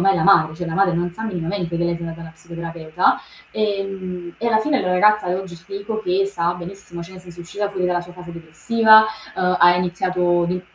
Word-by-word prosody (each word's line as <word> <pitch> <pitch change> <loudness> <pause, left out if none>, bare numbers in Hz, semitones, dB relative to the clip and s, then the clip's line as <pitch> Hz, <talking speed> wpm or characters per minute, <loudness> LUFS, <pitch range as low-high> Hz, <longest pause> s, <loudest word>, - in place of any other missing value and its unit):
mai 195 +2 +4
alla 165 -4 0
madre, 165 -6 +5
cioè 175 +1 -5
la 165 - -4
madre 195 -2 +3
non 175 +1 -1
sa 220 - -8
minimamente 175 -3 -3
che 170 - 0
lei 170 0 0
se - - -12
ne 170 - -4
va 165 - -6
da - - -12
una 160 - -9
psicoterapeuta. 165 0 -2 0.3
Ehm, 195 -4 -3
e 235 - -3
alla 220 -2 +3
fine 275 +4 +1
la 185 - -1
ragazza 210 +1 +3
oggi, 185 0 -3
ci 165 +1 -15
dico 200 +2 -4
che 190 +1 +1
sta 175 -3 -1
benissimo, 175 0 -9
cioè 180 +3 -11
nel 185 - -11
senso, 175 -1 -13
è - - -7
uscita 200 +4 -3
fuori 185 -2 -1
dalla 180 -1 0
sua 175 0 -11
fase 180 -1 -10
depressiva, 220 +7 +4 0.3
uhm 180 0 +1
ha 175 0 +7
iniziato 175 0 0
di 180 0 -2
180 Hz, 240 wpm, -21 LUFS, 170-195 Hz, 0.3 s, ha